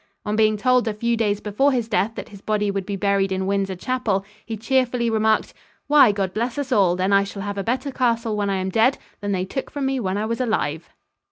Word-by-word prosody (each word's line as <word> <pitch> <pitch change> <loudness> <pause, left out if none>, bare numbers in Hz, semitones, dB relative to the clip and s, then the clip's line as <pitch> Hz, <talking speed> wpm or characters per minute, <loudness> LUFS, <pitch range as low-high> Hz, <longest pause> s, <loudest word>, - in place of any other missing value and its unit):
On 210 0 -1
being 215 -1 +3
told 250 +1 +2
a 215 - -1
few 235 +2 0
days 210 -3 0
before 220 +7 +2
his 240 -4 -1
death 210 +1 0
that - - -7
his 200 -3 -13
body 210 -1 0
would 195 -1 -3
be 200 - -2
buried 195 0 +1
in 190 0 -1
Windsor 195 -1 -1
Chapel, 205 -1 -1 0.2
he 225 -1 -5
cheerfully 245 0 +1
remarked: 220 0 +1 0.3
"Why, 290 -6 +6
God 195 -2 -2
bless 235 +3 -2
us 280 -2 -3
all, 195 -7 +4
then 185 +2 0
I 200 0 +5
shall 200 0 -6
have 205 0 -4
a - - -2
better 260 +5 -1
castle 230 -4 0
when 205 -1 -1
I 195 - 0
am 190 0 -2
dead 225 +6 +3 0.2
than 205 0 -3
they 185 -1 0
took 265 +7 -5
from 285 -2 -3
me 265 0 0
when 190 -3 -1
I 210 - -1
was 230 +3 -2
alive." 170 -9 -1
215 Hz, 245 wpm, -22 LUFS, 195-235 Hz, 0.3 s, Why